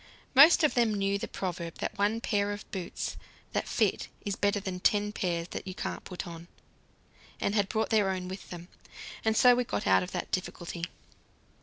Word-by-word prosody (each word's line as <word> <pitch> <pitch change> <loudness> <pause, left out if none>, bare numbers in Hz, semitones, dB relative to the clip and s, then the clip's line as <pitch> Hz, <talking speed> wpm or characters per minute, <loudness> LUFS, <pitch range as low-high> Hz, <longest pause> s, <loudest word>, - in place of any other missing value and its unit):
Most 300 +5 +8
of 305 - +4
them 230 -3 +2
knew 200 0 0
the - - -4
proverb 170 -3 -4
that - - -3
one 210 +3 +1
pair 205 -3 +1
of 205 +1 -6
boots 185 -3 -4 0.4
that - - -1
fit - - +1 0.2
is 200 -1 -1
better 200 0 +1
than 190 -2 -4
ten 210 +2 +2
pairs 175 -4 -2
that - - -6
you 185 - -5
can't - - -4
put 180 - -6
on, 170 0 -9 0.9
and 200 - 0
had 205 -2 +2
brought 220 0 0
their 210 -3 +4
own 185 -1 -2
with 190 +2 -8
them. 175 -1 -8 0.6
And 220 0 +2
so 250 -1 +8
we 250 +1 +2
got 105 - -3
out 95 0 +5
of 90 - -5
that - - -4
difficulty. 175 -2 -3
200 Hz, 195 wpm, -30 LUFS, 180-215 Hz, 0.9 s, Most